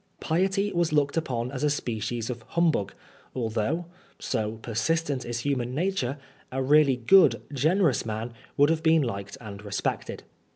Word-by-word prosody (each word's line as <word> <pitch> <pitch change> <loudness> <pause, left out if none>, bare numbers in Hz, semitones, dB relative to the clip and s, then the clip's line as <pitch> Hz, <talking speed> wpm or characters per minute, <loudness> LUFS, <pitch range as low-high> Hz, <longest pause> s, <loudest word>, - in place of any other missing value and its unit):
Piety 195 +5 0
was 170 -2 +1
looked 145 -2 +2
upon 125 -6 -2
as 140 0 -4
a 150 - +3
species 120 -3 -2
of 120 -2 -7 0.2
humbug, 160 - +2 0.4
although 120 +8 -1 0.3
(so 110 -1 -2
persistent 135 +4 -1
is 120 0 -3
human 125 -2 -1
nature) 155 -6 -1 0.3
a 130 - -2
really 145 0 +5
good, 125 - +5
generous 155 - +2
man 110 +1 -4 0.2
would 145 +2 +5
have 160 -1 0
been 160 -1 +4
liked 100 -1 -5
and 105 -4 -9
respected. 100 -1 -3
135 Hz, 150 wpm, -27 LUFS, 115-160 Hz, 0.4 s, really